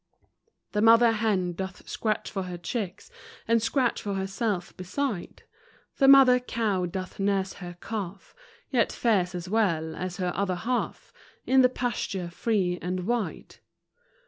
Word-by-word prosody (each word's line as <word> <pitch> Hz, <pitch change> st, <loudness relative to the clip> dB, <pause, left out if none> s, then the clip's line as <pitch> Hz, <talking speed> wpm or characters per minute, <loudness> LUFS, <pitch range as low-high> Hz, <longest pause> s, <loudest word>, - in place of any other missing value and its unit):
The 210 Hz, -, 0 dB
mother 230 Hz, +1 st, +7 dB
hen 210 Hz, -5 st, 0 dB
doth 190 Hz, +1 st, -7 dB
scratch 215 Hz, -2 st, -2 dB
for 195 Hz, -, -2 dB
her 180 Hz, -1 st, -6 dB
chicks, 185 Hz, +1 st, -5 dB, 0.4 s
And 230 Hz, 0 st, +3 dB
scratch 250 Hz, +1 st, +1 dB
for 200 Hz, -1 st, -3 dB
herself 195 Hz, -1 st, -2 dB
beside; 195 Hz, +2 st, -4 dB, 0.5 s
The 270 Hz, -, +4 dB
mother 270 Hz, -2 st, +8 dB
cow 215 Hz, -7 st, -1 dB
doth 185 Hz, +2 st, -6 dB
nurse 195 Hz, -1 st, 0 dB
her 175 Hz, -1 st, -8 dB
calf, 200 Hz, -3 st, -6 dB, 0.4 s
Yet 240 Hz, -4 st, +2 dB
fares 190 Hz, -6 st, +1 dB
as 175 Hz, 0 st, -5 dB
well 170 Hz, -7 st, 0 dB
as 180 Hz, -1 st, -4 dB
her 180 Hz, -2 st, -1 dB
other 195 Hz, -2 st, 0 dB
half 240 Hz, +8 st, -3 dB, 0.3 s
In 265 Hz, 0 st, +5 dB
the 250 Hz, -, +6 dB
pasture 205 Hz, -8 st, -3 dB
free 180 Hz, -3 st, 0 dB
and 180 Hz, +1 st, -2 dB
wide. 235 Hz, 0 st, -3 dB
200 Hz, 145 wpm, -27 LUFS, 180-230 Hz, 0.5 s, mother